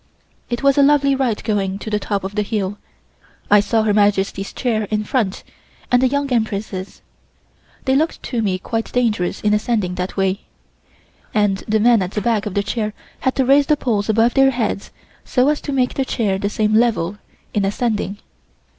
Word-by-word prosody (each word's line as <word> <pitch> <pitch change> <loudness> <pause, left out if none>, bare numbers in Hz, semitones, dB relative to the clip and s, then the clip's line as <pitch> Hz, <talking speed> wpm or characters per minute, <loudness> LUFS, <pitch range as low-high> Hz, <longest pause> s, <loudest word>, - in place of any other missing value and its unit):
It 240 +2 -3
was 275 0 +4
a - - +7
lovely 280 -1 +4
ride 260 -5 -1
going 195 -3 -1
to 215 +2 -7
the 210 - +1
top 200 -1 -2
of 195 +1 -5
the 210 - 0
hill. 205 -1 -2 0.7
I 205 - +8
saw 220 +2 +1
Her 215 -1 +2
Majesty's 200 -1 +1
chair 220 -5 -1
in 215 -1 0
front, 210 -4 -1 0.5
and 245 0 +4
the 260 - +4
Young 280 0 -1
Empress'. 205 -4 -3 0.8
They 265 -1 +2
looked 315 +4 0
to 240 -3 -2
me 195 -4 0
quite 225 +4 -4
dangerous 215 -7 0
in 210 0 +2
ascending 210 -4 0
that 185 - -5
way, 195 0 0 0.9
and 205 -2 +2
the 220 +1 +2
men 235 -1 +4
at 185 +1 -3
the 210 - -1
back 220 -1 0
of 200 - -6
the 200 - +1
chair 215 0 -2 0.3
had 260 - 0
to 265 - +2
raise 280 +2 +4
the 300 - +3
poles 220 -6 -1
above 225 +2 +3
their 270 -1 +5
heads 235 -5 -2 0.3
so 255 +2 +2
as 300 - 0
to - - -4
make 255 -2 +1
the 270 - 0
chair 210 -7 -1
the 200 - -1
same 215 0 0
level 215 -4 +1 0.3
in 205 - +1
ascending. 205 0 -1
215 Hz, 195 wpm, -19 LUFS, 200-250 Hz, 0.9 s, I